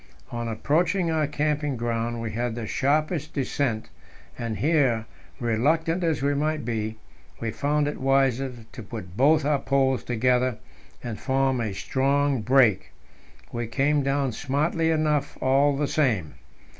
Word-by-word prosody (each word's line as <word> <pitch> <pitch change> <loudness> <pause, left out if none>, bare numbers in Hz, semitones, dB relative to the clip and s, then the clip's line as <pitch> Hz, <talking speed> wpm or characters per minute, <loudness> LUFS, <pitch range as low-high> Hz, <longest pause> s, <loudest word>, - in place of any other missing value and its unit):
On 120 -1 -3
approaching 165 - +1
our 155 -2 +1
camping 150 -2 -1
ground 115 0 -2
we 115 -1 -3
had 120 0 -2
the 120 -2 -4
sharpest 150 - 0
descent, 130 -4 -1 0.5
and 115 -2 -4
here, 135 -8 +2 0.3
reluctant 160 +9 +1
as 160 -5 0
we 140 +1 +2
might 150 -1 -1
be, 110 -2 -2 0.4
we 115 -1 -2
found 145 +4 0
it 145 - -4
wiser 135 -1 +2 0.2
to 125 - -8
put 100 -5 -8
both 150 +5 +4
our 145 -1 +2
poles 135 -2 +1
together 125 0 +1 0.5
and 115 -3 -5
form 135 -2 +1
a 110 -3 -2
strong 135 +6 +1
brake. 115 -4 +3 0.6
We 120 -1 -3
came 140 +5 +1
down 135 -1 0
smartly 150 +7 0
enough, 155 -3 0
all 140 +2 +3
the 145 0 0
same. 115 - 0
135 Hz, 145 wpm, -25 LUFS, 120-150 Hz, 0.6 s, both